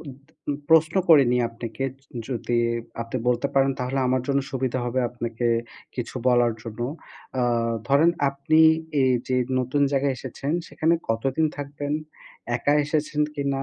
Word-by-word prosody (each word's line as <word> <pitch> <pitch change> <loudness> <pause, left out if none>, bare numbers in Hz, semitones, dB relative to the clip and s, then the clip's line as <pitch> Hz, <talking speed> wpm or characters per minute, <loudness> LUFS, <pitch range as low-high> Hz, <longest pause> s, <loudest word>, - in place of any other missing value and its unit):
উদ 145 - -8 0.4
উম 145 - +1 0.2
প্রশ্ন 160 0 +5
করে 155 -4 +8
নিই 125 - +2
আপনাকে 115 +2 -6
য 130 - -13 0.3
যদি 120 -1 -1 0.4
আপনি 115 +2 -5
বলতে 125 +3 +1
পারেন, 135 0 +4
তাহলে 125 +2 -2
আমার 130 0 +1
জন্য 140 0 +2
সুবিধা 130 -1 -1
হবে 130 +2 0
আপনাকে 120 0 -3 0.5
কিছু 125 0 -4
বলার 120 -1 +4
জন্য। 115 0 -8 0.6
আ - - +2 0.5
ধরেন 150 +5 +5 0.2
আপনি 145 +3 +2 0.4
এই 130 - +4 0.2
যে 130 - +1 0.2
নতুন 135 +3 0
জায়গায় 135 -1 +1
এসেছেন, 135 +3 -4 0.2
সেখানে 155 +3 +1
কতদিন 135 +7 +1
থাকবেন? 145 0 -4 0.6
একা 145 - +1
এসেছেন 150 0 -1
কিনা? 140 -1 -1
135 Hz, 150 wpm, -24 LUFS, 120-145 Hz, 0.6 s, করে